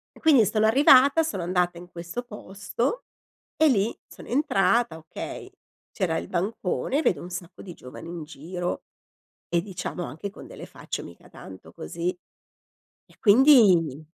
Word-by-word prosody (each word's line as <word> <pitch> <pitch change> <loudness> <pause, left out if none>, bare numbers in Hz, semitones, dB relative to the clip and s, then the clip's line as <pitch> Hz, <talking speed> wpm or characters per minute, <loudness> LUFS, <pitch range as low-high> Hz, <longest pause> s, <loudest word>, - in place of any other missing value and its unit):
E - - -16
quindi 280 -9 +5
sono 215 +2 +1
arrivata, 275 +5 +6
sono 195 - -3
andata 175 -1 0
in 175 +1 -11
questo 175 +8 -6
posto 210 - -4 0.5
e 315 0 +4
lì 220 -3 +1
sono - - -14
entrata, 235 - +1
okay, 160 0 -8 0.4
c'era - - -1
il 85 - -6
bancone, 210 - -1
vedo 155 - +1
un 180 - -9
sacco 175 -1 -8
di 180 -4 -9
giovani 125 +6 -11
in 170 -2 -6
giro, 175 +4 -5 0.6
e 170 - +1
diciamo 180 -2 -5
anche 200 +6 -6
con - - -12
delle - - -10
facce, - - -6
mica - - -13
tanto 95 -1 -13
così. 170 - -4 1.0
E - - -24
quindi, 200 - +5
190 Hz, 150 wpm, -25 LUFS, 170-240 Hz, 1.0 s, arrivata